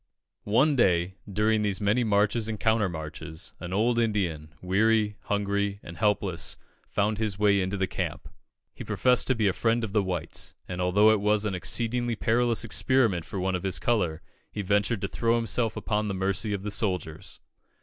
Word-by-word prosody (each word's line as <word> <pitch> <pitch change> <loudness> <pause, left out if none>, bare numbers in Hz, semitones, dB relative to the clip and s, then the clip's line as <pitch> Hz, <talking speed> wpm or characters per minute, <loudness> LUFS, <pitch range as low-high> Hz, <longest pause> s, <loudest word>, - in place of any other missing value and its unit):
"One 140 +8 +4
day, 90 -6 +2 0.2
during 105 +2 +2
these 100 -2 0
many 105 +4 +2
marches 105 +1 +1
and 110 -2 -4
countermarches, 80 -7 -2
an 85 +1 -7
old 115 +5 +1
Indian, 90 -9 -1
weary, 105 +3 +2
hungry, 100 0 -1
and 85 - -9
helpless, 100 -3 0 0.3
found 105 +1 0
his 105 -3 -1
way 100 -1 +3
into 95 +2 -2
the 95 - +1
camp. - - -4 0.5
He - - -8
professed 125 -1 +3
to 130 - +2
be 110 -3 +1
a 95 - +2
friend 115 +3 +1
of 110 - -3
the 105 0 +2
whites; 90 -4 -4
and, 90 0 -4
although 100 +4 +4
it 110 -2 +1
was 105 0 +2
an 105 - -1
exceedingly 120 +5 0
perilous 115 +2 +1
experiment 115 -5 +1
for 100 - -5
one 95 +1 -1
of 90 - -2
his 95 0 -1
colour, 90 -10 0 0.3
he 105 - -4
ventured 105 +2 +1
to - - -1
throw 115 0 0
himself 115 0 -1
upon 105 -1 -1
the 100 - -2
mercy 95 +3 -1
of 100 -1 -3
the 105 - -4
soldiers. 90 -7 -3
105 Hz, 180 wpm, -27 LUFS, 95-110 Hz, 0.5 s, One